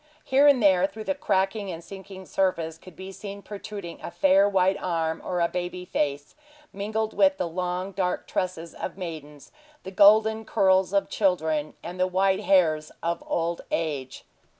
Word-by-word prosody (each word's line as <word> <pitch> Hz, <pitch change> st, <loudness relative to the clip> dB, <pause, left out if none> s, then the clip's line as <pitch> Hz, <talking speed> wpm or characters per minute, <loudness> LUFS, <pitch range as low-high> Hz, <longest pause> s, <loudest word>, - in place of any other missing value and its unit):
Here 275 Hz, +2 st, +5 dB
and 265 Hz, -5 st, +5 dB
there, 190 Hz, -2 st, +5 dB
through 215 Hz, +2 st, -9 dB
the 285 Hz, -, 0 dB
cracking 200 Hz, -5 st, 0 dB
and 165 Hz, 0 st, -7 dB
sinking 190 Hz, +1 st, -10 dB
surface, 165 Hz, -5 st, -1 dB
could 185 Hz, -1 st, -14 dB
be 190 Hz, +1 st, -8 dB
seen 200 Hz, +1 st, -8 dB
protruding 200 Hz, -4 st, -8 dB
a -, -, -6 dB
fair 195 Hz, +1 st, +4 dB
white 190 Hz, -1 st, +2 dB
arm, 165 Hz, -3 st, -1 dB
or 180 Hz, -1 st, -2 dB
a 170 Hz, -, +3 dB
baby 180 Hz, +1 st, -4 dB
face, 145 Hz, -4 st, -2 dB, 0.4 s
mingled 215 Hz, +2 st, -2 dB
with 195 Hz, -1 st, +3 dB
the 180 Hz, -, -1 dB
long, 180 Hz, +2 st, -3 dB
dark 185 Hz, -1 st, -2 dB
tresses 170 Hz, -3 st, -3 dB
of 180 Hz, -, -6 dB
maidens, 155 Hz, -5 st, -8 dB, 0.3 s
the 190 Hz, -, -7 dB
golden 220 Hz, +3 st, +5 dB
curls 190 Hz, -3 st, +2 dB
of 200 Hz, 0 st, +1 dB
children, 160 Hz, -6 st, 0 dB
and 180 Hz, +2 st, -7 dB
the 185 Hz, -, +3 dB
white 190 Hz, +1 st, +2 dB
hairs 155 Hz, -5 st, +2 dB
of 170 Hz, 0 st, -2 dB
old 170 Hz, 0 st, -1 dB
age. 145 Hz, -6 st, -3 dB
185 Hz, 170 wpm, -26 LUFS, 170-200 Hz, 0.4 s, Here